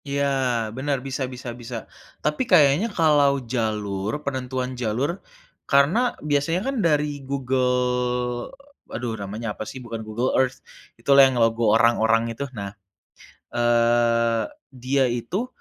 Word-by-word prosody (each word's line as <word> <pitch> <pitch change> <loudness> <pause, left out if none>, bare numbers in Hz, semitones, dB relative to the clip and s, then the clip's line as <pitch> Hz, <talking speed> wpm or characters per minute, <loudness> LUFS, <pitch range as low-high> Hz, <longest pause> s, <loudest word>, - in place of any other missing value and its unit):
Iya, 140 0 0 0.5
benar, 140 +1 0
bisa 135 0 -3
bisa 125 0 -7
bisa. 120 +1 -7 0.5
Tapi 150 +10 +1
kayaknya 160 +4 +5
kalau 150 -6 +3 0.2
jalur 105 -4 -1
penentuan 130 -1 -3
jalur, 125 - -1 0.5
karena 150 - +3
biasanya 150 +5 +1
kan 275 - -2
dari 150 -2 0
Google 125 -2 0 0.4
aduh 120 0 -3
namanya 105 +2 -4
apa - - -5
sih, - - -8
bukan 115 -1 -5
Google 110 +4 -2
Earth 130 0 -1 0.4
itulah 140 0 +6
yang 130 - -3
logo 115 0 +2
orang-orang 115 0 +3
itu. 130 - -5
Nah, 100 0 -5 0.8
eee, 115 -1 +2 0.4
dia 135 +1 +2
itu 120 - -2
125 Hz, 125 wpm, -23 LUFS, 115-140 Hz, 0.8 s, itulah